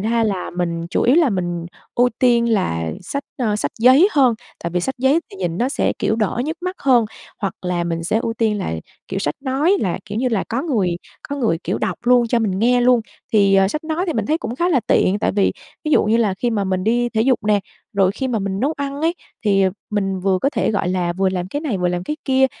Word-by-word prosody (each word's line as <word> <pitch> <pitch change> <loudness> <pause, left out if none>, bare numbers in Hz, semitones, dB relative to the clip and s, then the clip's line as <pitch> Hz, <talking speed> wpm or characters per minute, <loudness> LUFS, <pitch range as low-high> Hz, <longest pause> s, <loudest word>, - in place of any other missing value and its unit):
ra 230 +2 +1
là 195 -4 -2
mình 170 -1 -2
chủ - - +1
yếu 250 +5 +4
là 325 -6 +4
mình 175 -3 -2 0.3
ưu 245 +1 +4
tiên 235 -2 +3
là 80 - 0
sách, 280 +10 -4 0.2
ờ, 215 -5 +1
sách - - -2
giấy 260 - +6
hơn 260 -5 +4 0.3
tại 170 - -2
vì 175 +1 0
sách 265 +10 -2
giấy 265 +6 +3
thì - - -11
nhìn 175 -2 -3
nó 245 - +1
sẽ, - - 0
kiểu, 220 - 0
đỡ 225 +2 0
nhức 315 +3 -3
mắt 365 +1 -3
hơn, 250 -4 +4 0.3
hoặc 195 -4 -2
là 180 -1 -1
mình 165 -1 -3
sẽ 210 +6 +1
ưu 225 - -1
tiên 220 -3 +1
là, 190 - -3 0.4
kiểu, - - -2
sách 145 - -1
nói 285 +8 +2
là 180 -4 -1
kiểu 210 0 -4
như 255 +1 +1
là 220 -5 0
có 235 +4 -1
người 200 - 0 0.3
có 285 - -3
người, 225 -12 +1
kiểu, - - -1
đọc - - -2
luôn 245 -1 +5
cho 240 - +2
mình 195 -4 -1
nghe 245 +3 +3
luôn. 245 -1 +4 0.3
Thì, 200 -3 +4
ờ, 195 0 +5
sách 305 +9 -4
nói 320 +3 -1
thì 335 - 0
mình 220 -5 -1
thấy 315 - +1
cũng 235 - -4
khá 345 +5 +1
là 295 -8 +3
tiện 195 +2 +3
tại 220 - 0
vì 200 -1 +2 0.3
ví 305 - -1
dụ - - +4
như 215 +2 +3
là 215 -5 +2
khi 240 +5 -1
mà 205 -3 0
mình 185 0 -1
đi 240 +2 +2
thể 220 -2 -1
dục 255 +1 +3
nè, 210 -1 +3 0.3
rồi 195 -2 +3
khi 260 +5 -3
mà 235 -3 0
mình 195 -1 -3
nấu 280 +5 +1
ăn 280 0 -4
ấy 330 +2 +1 0.3
thì, 200 -2 +3
ờ, 190 - +3 0.2
mình 195 -2 -1
vừa 190 0 +2
có 275 - +1
thể, - - 0
gọi 205 -4 0
là, 180 -1 0
vừa 190 +2 +1
làm 185 -1 -3
cái 285 +9 -3
này, 270 -11 -2
vừa 180 0 +1
làm 175 0 -2
cái 300 - -3
kia 265 -1 +4
220 Hz, 265 wpm, -20 LUFS, 190-260 Hz, 0.4 s, giấy